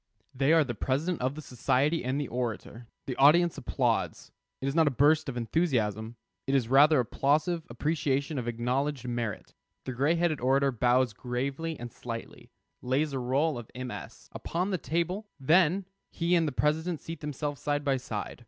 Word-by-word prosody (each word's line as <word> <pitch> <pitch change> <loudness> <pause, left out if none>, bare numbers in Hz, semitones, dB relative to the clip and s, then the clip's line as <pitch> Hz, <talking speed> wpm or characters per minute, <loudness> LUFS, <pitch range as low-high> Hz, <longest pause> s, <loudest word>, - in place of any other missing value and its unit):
They 135 +3 +2
are 165 -1 +6
the 125 -4 -4
president 145 +9 -1
of 130 +2 -1
the 155 - -7
society 135 +6 +1
and 130 +3 -1
the 145 - -2
orator. 120 -1 -4 0.2
The 130 - -3
audience 165 +5 +5
applauds. - - -1 0.3
It 135 - -3
is 135 - 0
not 160 -1 +4
a - - +6
burst 145 +3 +3
of 125 - -5
enthusiasm; 115 - 0 0.3
it 135 - +2
is 125 -4 +2
rather 145 +2 +6
applausive 155 +7 0
appreciation 140 +2 -1
of 120 - -5
acknowledged 125 +3 -1
merit. 120 -4 -4 0.3
The 130 - -4
gray 140 +7 +2
headed 165 -4 0
orator 135 +2 +3
bows 125 0 +2
gravely 135 +8 -3
and 120 -1 -7
slightly, 115 -1 -8 0.3
lays 140 +4 0
a 135 - -1
roll 135 +3 0
of 115 - -11
MS. 120 - -7
upon 180 +4 -2
the 185 - -1
table, 175 +7 -2
then 175 +6 +3 0.2
he 170 +1 -1
and 165 -2 +3
the - - -1
president 155 +4 0
seat 165 -1 -7
themselves 145 -1 -4
side 145 0 -1
by 135 -1 +2
side. 110 -3 -5
140 Hz, 175 wpm, -29 LUFS, 125-160 Hz, 0.3 s, are